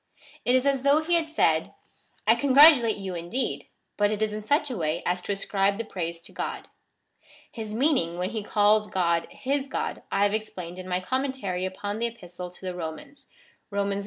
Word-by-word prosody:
It 250 - +4
is 255 +1 +2
as 275 -2 +2
though 280 +3 +4
he 345 +2 -1
had 330 -2 +2
said 160 - +1 0.2
— - - -31
" - - -38
I - - +7
congratulate 275 -5 +6
you 195 -2 -5
indeed, 175 +10 -3 0.3
but 205 0 +3
it 210 -1 -2
is 215 -1 -1
in 215 0 -5
such 290 +5 +1
a - - -3
way 160 -4 -1
as 180 +1 0
to 205 - -4
ascribe 200 0 0
the 230 - -2
praise 170 -4 -4
to - - -11
God." - - -5 0.8
His 215 -2 -6
meaning, 245 - +1
when 180 +3 -2
he 220 -2 -3
calls 210 +1 +3
God 170 -4 +1
his 275 +1 -2
God, - - -3
I 195 - +2
have 205 0 +2
explained 185 -5 -4
in 185 - -8
my 180 0 0
Commentary 255 -6 -2
upon 205 +3 -4
the 235 - +1
Epistle 180 -6 -8
to 180 +1 -13
the 185 - -3
Romans 180 - -7 0.4
(Rom. 200 -1 -1
i. 200 - -2
205 Hz, 210 wpm, -26 LUFS, 180-260 Hz, 0.8 s, I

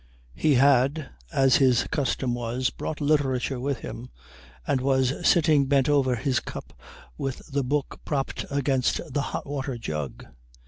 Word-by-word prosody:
He 145 - +2
had, 140 +3 +3 0.2
as 135 -1 +4
his 130 -4 +4
custom 130 -2 0
was, 120 +1 -1
brought 155 - -5
literature 135 -3 +1
with 135 0 -2
him, 125 +2 -7 0.6
and 130 - 0
was 130 -1 +2 0.2
sitting 155 -4 +4
bent 135 -1 +3
over 135 -4 +3
his 130 +2 0
cup - - -9 0.5
with 135 -2 -4
the 140 0 0
book 140 +2 -2
propped 140 -3 -2
against 135 -2 +1
the 145 - +1
hot - - -4
water 135 -2 -4
jug. 75 - -5
135 Hz, 145 wpm, -26 LUFS, 125-140 Hz, 0.6 s, as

